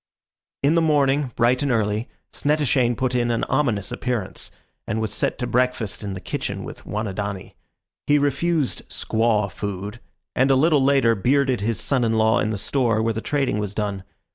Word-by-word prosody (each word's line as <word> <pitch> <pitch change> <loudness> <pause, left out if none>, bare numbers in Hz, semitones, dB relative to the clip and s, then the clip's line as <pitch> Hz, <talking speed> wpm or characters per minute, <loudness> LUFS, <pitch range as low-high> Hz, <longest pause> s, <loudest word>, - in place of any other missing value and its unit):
In 145 +3 +4
the 170 - +3
morning, 145 -3 +2
bright 125 +3 +3
and 145 - 0
early, 110 0 0 0.2
Snettishane 140 -5 +1
put 130 -1 0
in 120 -1 +1
an 115 -1 0
ominous 120 -8 0
appearance 120 -6 -3 0.4
and 110 - -1
was 110 -2 -2
set - - -1
to 125 - -2
breakfast 120 -4 0
in 100 -1 -4
the - - -5
kitchen - - -4
with - - -10
Wanidani. 100 -2 -4 0.5
He 145 - +5
refused 145 +1 0
"squaw 110 -3 0
food," 100 +4 -5 0.4
and 130 +2 +3
a 135 - +5
little 150 +1 +4
later 135 -4 +4
bearded 130 +3 +1
his 110 -2 -1
son 130 +3 +1
in 115 -1 +1
law 110 0 +3
in 110 - 0
the 110 - -2
store 115 0 +1
where 115 0 +1
the 110 - -4
trading 135 -7 0
was 105 -1 -4
done. 100 -3 -2
120 Hz, 180 wpm, -23 LUFS, 105-135 Hz, 0.5 s, He